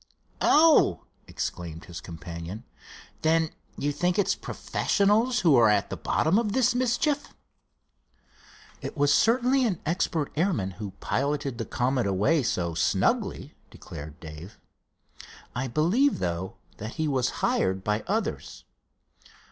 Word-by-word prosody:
"Oh!" 300 - +5 0.2
exclaimed 85 -2 -5
his 85 -3 -8
companion, 85 +5 -8 0.6
"then 160 0 +2 0.3
you 145 - -1
think 175 +5 0
it's 205 - +2
professionals 220 +5 +1
who 160 -6 +5
are 115 -2 +6
at 105 -1 +1
the - - -2
bottom 175 +7 +1
of 210 -3 -1
this 255 -2 +3
mischief?" 255 +4 0 1.5
"It - - -6
was 145 0 +3
certainly 250 +3 +3
an 205 -9 0
expert 160 -2 -1
airman 150 - 0
who 100 -3 -5
piloted 140 -2 -1
the 115 - -2
Comet 125 -2 0
away 105 - +2
so 85 -8 -1
snugly," 80 - 0 0.2
declared 75 +1 -10
Dave. 80 +4 -10 1.0
"I 130 +2 -2
believe, 180 - +2
though, 90 +1 -3 0.2
that 110 +3 -6
he 160 -1 -1
was 130 -4 +1 0.2
hired 95 0 0
by 105 +1 -1
others." 220 +4 -3
140 Hz, 125 wpm, -27 LUFS, -, 1.5 s, are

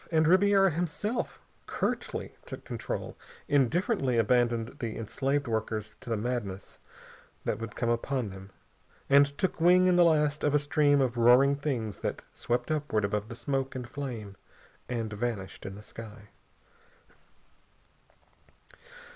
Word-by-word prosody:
And 160 -2 +3
Ribiera 195 +1 +5
himself 175 +8 -2 0.3
curtly - - -3
took - - -8
control, - - -5 0.3
indifferently 145 - +2
abandoned 120 +1 +1
the 115 -3 -4
enslaved 135 +5 -1
workers 110 -1 -2
to - - -10
the 115 - 0
madness 105 -4 -4 0.7
that - - -1
would 115 -1 -6
come 120 -1 0
upon 120 -2 -1
them, 95 +1 -10 0.6
and 140 +1 +7
took 185 -3 -1
wing 180 +2 +6
in 180 -1 +4
the 175 - +7
last 150 -3 +2
of 150 0 +2
a - - +7
stream 145 -1 +3
of 125 -2 0
roaring 125 +4 +6
things 125 -8 -3
that - - -3
swept 120 +6 -2
upward 145 -9 0
above 105 +1 -2
the 115 - -6
smoke 135 +1 -2
and 125 -2 -5
flame 120 -7 -6 0.5
and 115 -3 -3
vanished 105 -4 -4
in 95 - -7
the 105 - -11
sky. 110 -2 -10
125 Hz, 140 wpm, -29 LUFS, 110-150 Hz, 0.7 s, and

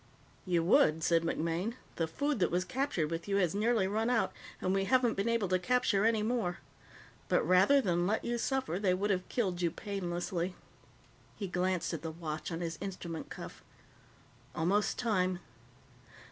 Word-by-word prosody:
"You 175 -2 +2
would," 160 -2 +4
said 165 0 +3
MacMaine. 170 +6 -1 0.2
"The 165 - 0
food 285 - -1
that 175 - +3
was 180 +2 0
captured 220 - -1
with 165 +2 -4
you 200 - 0
has 180 -5 +2
nearly 215 0 +2
run 220 +4 0
out, 240 -3 +1 0.3
and 185 - 0
we 195 0 +1
haven't 250 0 +3
been 200 +4 -1
able 230 -4 +1
to 185 0 +2
capture 215 0 +2
any 225 -2 +3
more. 220 -6 0 0.7
But - - +3
rather 190 +10 +6
than 175 -5 +1
let 215 +2 0
you 240 0 -1
suffer, 260 - -1
they 190 -3 +2
would 200 +2 0
have 185 -1 -1
killed 185 -7 -1
you 170 - +2
painlessly." 180 -2 -3 0.8
He 200 - -4
glanced 180 0 -1
at 160 - -4
the 165 - -4
watch 160 0 -5
on 165 +1 -3
his 165 -2 -4
instrument 180 -4 -5
cuff. - - -9 0.9
"Almost 195 +6 +1
time." 185 -6 +1
185 Hz, 175 wpm, -32 LUFS, 170-220 Hz, 0.9 s, rather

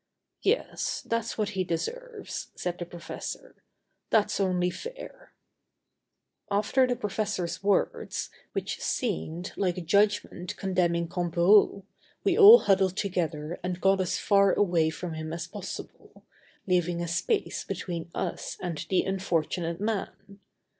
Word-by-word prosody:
"Yes, 450 +5 0
that's 230 0 -1
what 210 -2 0
he 190 -3 -1
deserves," 450 - -4
said 175 -1 -3
the 175 - -5
professor. 175 - -8 0.5
"That's 210 -2 +2
only 180 -2 +1
fair." - - -9 1.2
After 210 +6 +2
the 245 - 0
professor's 200 -5 -2
words, 200 -1 0 0.2
which - - -3
seemed 160 - -2
like 185 -3 0
a - - -3
judgment 200 0 +1
condemning 175 -3 +1
Comperou, 175 +4 +3 0.4
we - - +3
all 445 +3 +10
huddled 190 -1 +2
together 170 -5 -2
and 180 0 -3
got 195 0 +3
as 180 - -1
far 200 -1 +4
away 175 -5 +2
from 165 +2 -5
him 160 0 -5
as 170 0 -4
possible, 195 +2 -9 0.4
leaving 175 -2 +1
a 170 - -2
space 170 - -1
between 170 -2 -5
us 180 - -3
and 175 -3 -4
the 185 - +3
unfortunate 170 -3 -1
man. 205 -1 -4
185 Hz, 125 wpm, -28 LUFS, 170-205 Hz, 1.2 s, all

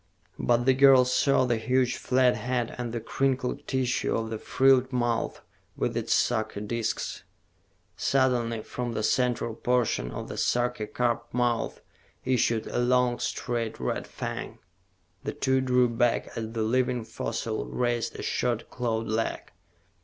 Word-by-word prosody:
But 120 0 +2
the 130 - +5
girl 135 -1 +7
saw 130 +1 +3
the 120 -2 +1
huge 125 +2 +1
flat 125 -1 +2
head 120 -2 -2
and 120 -1 -3
the 120 - -3
crinkled 130 +2 -1
tissue 130 -2 0
of 115 0 -3
the 110 - -3
frilled 130 +1 +3
mouth 120 -2 -1 0.4
with - - -1
its - - -2
sucker 110 -3 +1
disks. 115 +2 -3 0.7
Suddenly, 120 -4 +1
from 120 -1 -4
the 110 - -2
central 120 -1 +1
portion 120 - 0
of - - -6
the - - -7
sucker 120 -3 0
cup 120 0 -1
mouth 120 -2 0 0.4
issued 120 -3 +1
a - - -2
long, 125 0 +2
straight 120 -3 -3
red - - -2
fang. - - -5 0.7
The - - -3
two 130 -1 +1
drew 125 -1 +3
back 120 0 0
as 110 -1 -4
the 115 -2 -1
living 125 +1 +1
fossil 110 0 -3
raised 120 -1 -1
a - - -6
short 120 -2 -1
clawed 115 -2 -1
leg. 110 +1 -2
120 Hz, 145 wpm, -27 LUFS, 115-125 Hz, 0.7 s, girl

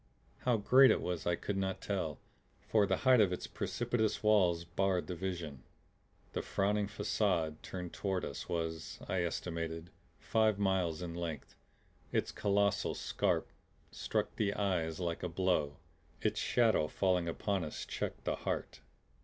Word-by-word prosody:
How 125 -2 +4
great 130 +6 +7
it - - +4
was 90 -3 -3
I 85 - +3
could 100 +3 -3
not 95 -1 -1
tell, 90 -8 -2 0.4
for 105 -2 +2
the - - +2
height 130 -3 +7
of 100 -4 +4
its 90 - -3
precipitous 120 -3 -1
walls 90 -6 +4
barred 95 0 0
the 90 - -4
vision. 85 -6 -4 0.7
The - - -1
frowning 100 +1 0
facade 90 -6 0
turned 90 -2 -6
toward 95 -2 -1
us - - -6
was, 80 -1 -3
I 95 - 0
estimated, 85 -1 -3 0.3
five 110 -2 +2
miles 95 -4 +1
in 85 -1 -4
length. 85 -3 -5 0.6
Its - - 0
colossal 100 -2 +1
scarp - - 0 0.4
struck - - -2
the 100 -1 +1
eyes 90 -5 0
like 85 -2 -2
a 90 - -2
blow; 85 -5 +1 0.4
its - - 0
shadow, 115 -10 +3
falling 90 -1 +1
upon 95 +3 -1
us, 75 - -5
checked - - -4
the - - 0
heart. - - -3
95 Hz, 150 wpm, -34 LUFS, 85-100 Hz, 0.7 s, great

